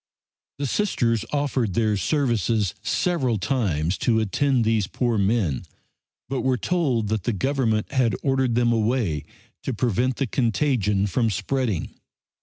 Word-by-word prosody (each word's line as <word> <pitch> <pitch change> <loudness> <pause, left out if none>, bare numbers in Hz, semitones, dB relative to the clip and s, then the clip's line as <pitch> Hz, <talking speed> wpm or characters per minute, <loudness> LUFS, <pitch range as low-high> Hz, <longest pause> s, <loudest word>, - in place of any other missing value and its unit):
The 140 - -2
Sisters 120 - 0
offered 135 -9 0
their 110 -2 +2
services 115 - 0
several 135 -11 0
times 95 - 0
to 115 -2 +2
attend 120 +3 +1
these 110 -3 +1
poor 120 -1 0
men, 95 - +1 0.6
but 135 0 -2
were 130 -1 +1
told 130 - 0
that 110 -3 -1
the 120 - +1
Government 115 -1 0
had 120 -7 +2
ordered 135 -3 +1
them 120 0 +3
away 110 - 0 0.4
to 130 - -3
prevent 125 +2 +1
the 135 - -1
contagion 115 -5 +1
from 115 +3 +1
spreading. 110 -1 -1
115 Hz, 135 wpm, -24 LUFS, 105-130 Hz, 0.6 s, them